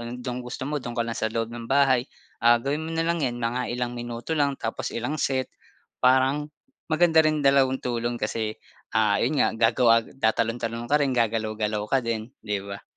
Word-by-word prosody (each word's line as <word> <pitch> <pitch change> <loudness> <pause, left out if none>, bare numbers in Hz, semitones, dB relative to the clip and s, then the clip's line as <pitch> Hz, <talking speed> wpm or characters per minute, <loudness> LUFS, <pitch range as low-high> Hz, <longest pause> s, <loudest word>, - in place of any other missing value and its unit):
'yong 120 +1 -7
dong 125 0 -3
gusto 125 +1 -6
mo 145 0 -2
do'n 120 -1 -6
ka 115 - +1
lang 115 - -3
sa 110 - 0
loob 115 +1 -3
ng 115 -1 -7
bahay. 135 -2 +3 0.3
Ah, 120 +1 +6
gawin 140 +6 -2
mo 160 - -5
na 165 - +1
lang 170 -1 0
'yan 125 -3 -1
mga 120 +1 -2
ilang 120 0 -2
minuto 120 +4 -5
lang 140 -3 +1
tapos 115 - -3
ilang 140 +6 -2
set. 130 -1 -1 0.5
Parang 130 +3 +3 0.4
maganda 160 0 +4
rin 155 -1 +2
dalawang 135 -1 +4
tulong 120 -1 -1
kasi, 110 0 -3 0.4
ah, 105 -2 +3
'yon 140 +5 +1
nga - - +3 0.2
gagawa 115 -1 +4
tatalon-talon 115 0 -1
ka 150 - +4
rin, 140 -2 +1
gagalaw-galaw 110 -2 0
ka 135 - +4
din, 115 0 -4
'di 105 -2 -3
ba? 100 0 -7
120 Hz, 195 wpm, -25 LUFS, 115-135 Hz, 0.5 s, Ah